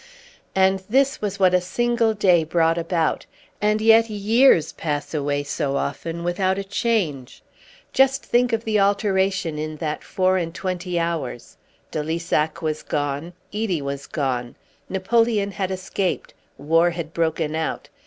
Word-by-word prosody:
And 190 0 +3
this 270 +3 +2
was 200 -1 -3
what 185 -2 +4
a 180 - +4
single 230 +4 +1
day 180 -5 +4
brought 165 +1 +2
about; 165 -1 -1 0.3
and 210 +1 +2
yet 225 +1 +5
years 210 - +4
pass 145 -1 -4
away 145 -1 -1
so 140 -1 -2
often 165 +4 -3
without 185 +2 0
a 200 - -2
change. 195 - -2 0.5
Just 270 +1 +3
think 245 +1 +2
of 225 0 0
the 215 -2 +1
alteration 195 -5 +1
in 155 0 -4
that 155 -1 -4
four 185 0 +1
and 165 -2 -3
twenty 180 -2 -3
hours. 165 -7 -3 0.4
De 155 - -2
Lissac 160 0 -1
was 155 -1 -1
gone. 145 +3 -3 0.2
Edie 210 -6 -1
was 140 0 -5
gone. 125 -5 -2 0.3
Napoleon 205 +1 +1
had 190 -1 -3
escaped. 190 0 -3 0.2
War 165 +5 +3
had 170 -2 -6
broken 160 -2 0
out. 160 0 -3
180 Hz, 145 wpm, -22 LUFS, 155-205 Hz, 0.5 s, yet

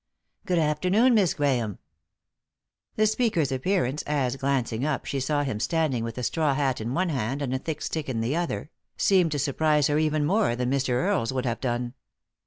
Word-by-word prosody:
" - - -48
Good 180 - +1
afternoon, 180 +11 +3
Miss 200 -7 +3
Grahame." 125 - 0 1.2
The 215 - +3
speaker's 215 - +1
appearance 145 0 0
as, 135 -4 0
glancing 135 -4 -1
up, 150 -1 -1
she 140 - -2
saw 145 +2 0
him 130 -7 -3
standing 150 -4 0
with 115 0 -5
a 125 - -3
straw 150 0 +1
hat 135 -4 0
in 120 +4 -3
one 185 +2 +1
hand 135 0 -2
and 130 -2 -2
a 130 - 0
thick 155 +2 -5
stick 155 -4 -3
in 120 -3 -2
the 115 +6 -1
other, 170 -2 -3 0.3
seemed 185 -5 +3
to - - -1
surprise 150 +1 +2
her 150 +1 +2
even 155 -1 +1
more 190 - +2
that 125 0 -2
Mr. 135 -1 0
Earle's 115 -2 +1
would 130 -1 -2
have 120 -2 -2
done. 120 -1 -2
140 Hz, 195 wpm, -26 LUFS, 125-160 Hz, 1.2 s, afternoon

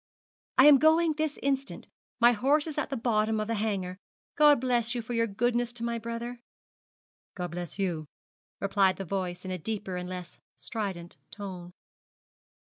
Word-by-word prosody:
'I 260 - +8
am 295 -2 +9
going 320 +2 +4
this 310 -1 -2
instant, 275 0 -1 0.3
my 240 0 +7
horse 275 +6 +2
is 310 -2 -3
at - - -2
the 270 - -2
bottom 220 -2 +1
of 215 - -1
the 230 - -1
Hanger. 200 -4 -2 0.4
God 295 -2 +6
bless 240 -1 +1
you 240 - -1
for 245 +2 -5
your 230 -1 +2
goodness 240 +3 0
to 235 -1 -7
my 235 0 -1
brother.' 235 +1 -5 1.0
'God 180 -3 -4
bless 175 0 -5
you,' 170 -6 -2 0.5
replied 195 -1 +3
the 195 - -5
voice 180 -1 -3
in 185 - -4
a 185 - -3
deeper 200 0 -3
and 180 0 -5
less 180 -1 -7 0.2
strident 195 -7 -5
tone. 185 -4 -8
225 Hz, 170 wpm, -29 LUFS, 185-245 Hz, 1.0 s, am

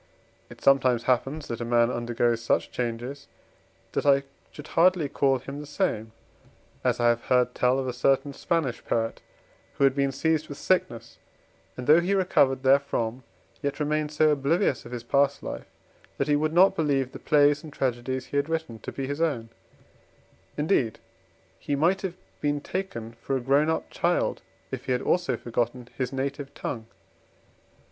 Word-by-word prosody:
It - - -13
sometimes 130 -3 +4
happens, 135 +5 0
that 115 0 -4
a - - -1
man 120 0 +3
undergoes 120 -1 0
such 115 - 0
changes, 125 +3 -4 0.6
that - - -1
I 140 -1 +4 0.3
should 150 0 -11
hardly 175 -2 +3
call 135 -1 +2
him 140 +3 -8
the 150 - -8
same. 125 - -1 0.7
As - - +1
I 120 0 +4
have 120 0 0
heard 125 -1 +2
tell 125 +1 +2
of 135 -1 -2
a 125 - -2
certain 135 +3 +1
Spanish 155 -5 -1
poet, 115 0 -1 0.5
who - - 0
had 135 -1 +5
been 140 0 +1
seized 155 +2 0
with 145 - -7
sickness, 120 -11 -1 0.6
and 125 - -5
though 155 +4 +7
he 185 +3 +1
recovered 145 -8 +2
therefrom 130 -3 +2 0.4
yet 140 0 -2
remained 150 0 0
so 155 0 +3
oblivious 145 - +1
of - - -12
his 120 -2 -5
past 140 +3 +1
life, - - -6 0.5
that - - 0
he 145 - +3
would 155 +1 +1
not 180 +4 +5
believe 140 -4 0
the - - -9
plays 145 0 +3
and 155 - -9
tragedies 130 -1 -2
he 145 - -3
had 140 +2 0
written 160 -9 -3
to - - -7
be 135 - -4
his 145 +4 -4
own: 130 -9 0 1.1
indeed, 150 - +1 0.6
he 145 - -2
might 175 +7 +2
have 185 -3 -4 0.3
been 145 0 0
taken 145 -10 -5
for 135 - -1
a - - -2
grown 140 +5 +2
up 160 - -1
child, - - 0 0.3
if - - -5
he 130 - +1
had 125 - 0
also 170 -9 +1
forgotten 120 +1 -2
his 130 -1 -2
native 140 +1 -3
tongue. 115 -3 -5
140 Hz, 175 wpm, -26 LUFS, 125-150 Hz, 1.1 s, though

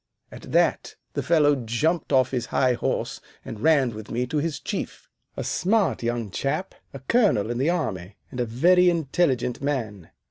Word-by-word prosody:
At - - -11
that - - +1 0.2
the - - -1
fellow 150 -3 +3
jumped 140 +8 -1
off 130 -2 +3
his 125 -3 -2
high 130 -1 +2
horse - - -2 0.2
and 110 - -7
ran 140 -3 +3
with 110 -1 -9
me 120 +2 -1
to 140 +5 -3
his 150 -2 -2
Chief, - - -5 0.3
a - - -2
smart 205 +1 +1
young 120 -3 -2
chap, 155 - -2 0.2
a 135 - -9
colonel 135 - +2
in 120 - -3
the 140 +5 +2
army, 105 - -3 0.2
and 125 - -7
a 120 - +1
very 180 +10 +4
intelligent 135 -6 0
man. 115 - -3
130 Hz, 175 wpm, -24 LUFS, 120-160 Hz, 0.3 s, very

